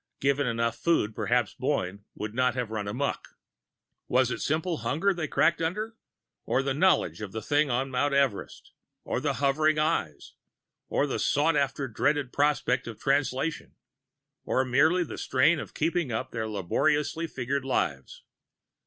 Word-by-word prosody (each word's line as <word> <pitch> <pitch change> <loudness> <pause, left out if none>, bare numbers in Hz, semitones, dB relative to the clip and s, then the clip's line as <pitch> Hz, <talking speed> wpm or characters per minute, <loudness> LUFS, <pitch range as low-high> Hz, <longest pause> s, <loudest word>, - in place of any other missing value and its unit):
Given 140 0 +1
enough 115 -1 -1
food, 160 -11 +1
perhaps - - 0
Boyne 100 +3 -2
would 105 0 -5
not 125 +1 +1
have 125 -4 -3
run 105 -2 -3
amok. 130 +8 -3 0.7
Was 125 0 +2
it - - -3
simple 160 +3 0
hunger 180 +9 +1
they 170 -3 -3
cracked 165 +2 +2
under? 210 +7 -2 0.5
Or 135 - 0
the 135 0 0
knowledge 140 - +2
of 105 -3 -6
the 110 - -4
thing 145 +3 +2
on 130 +2 -1
Mount 140 +3 +1
Everest, 135 -7 -1 0.3
or - - -2
the - - 0
hovering 150 +3 +2
Eyes, 150 - -1 0.6
or - - +1
the 140 - -2
sought 150 +3 +2
after 140 -1 0
dreaded 140 +3 0
prospect 145 -3 +1
of 115 -3 -8
Translation, 140 +2 -1 0.7
or 130 - +1
merely 155 +8 +3
the 165 - -7
strain 150 +6 +3
of - - -8
keeping 165 -3 0
up 110 - -3
their 110 -2 -3
laboriously 145 - 0
figured 135 -1 -2
lives? 70 - -2
140 Hz, 155 wpm, -27 LUFS, 120-155 Hz, 0.7 s, merely